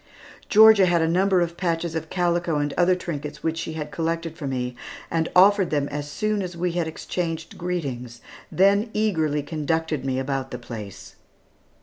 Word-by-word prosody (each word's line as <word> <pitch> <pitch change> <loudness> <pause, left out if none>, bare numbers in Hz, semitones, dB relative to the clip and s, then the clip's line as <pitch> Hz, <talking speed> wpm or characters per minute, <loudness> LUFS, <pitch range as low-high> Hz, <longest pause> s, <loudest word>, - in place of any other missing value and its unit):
Georgia 215 -3 +7
had 175 -1 +3
a - - +2
number 185 +2 +3
of 170 -1 -1
patches 170 -2 -1
of 160 -1 -4
calico 175 -3 0
and 145 -1 -1
other 180 +1 +3
trinkets 150 -4 -6
which 165 0 -1
she 160 - -4
had 150 -1 -5
collected 165 0 -2
for 150 -4 -5
me, 125 -2 -3 0.4
and 165 -1 0
offered 195 0 +6
them 145 -2 0
as 145 0 -5
soon 215 +5 -1
as 180 -2 -5
we 175 +1 0
had 170 -1 -1
exchanged 165 0 -4
greetings, 135 -10 -4 0.3
then 200 +4 +3
eagerly 160 -9 +1
conducted 155 -1 -2
me 130 -1 -1
about 135 0 -2
the 125 - -5
place. 100 -5 -9
165 Hz, 175 wpm, -24 LUFS, 145-180 Hz, 0.4 s, Georgia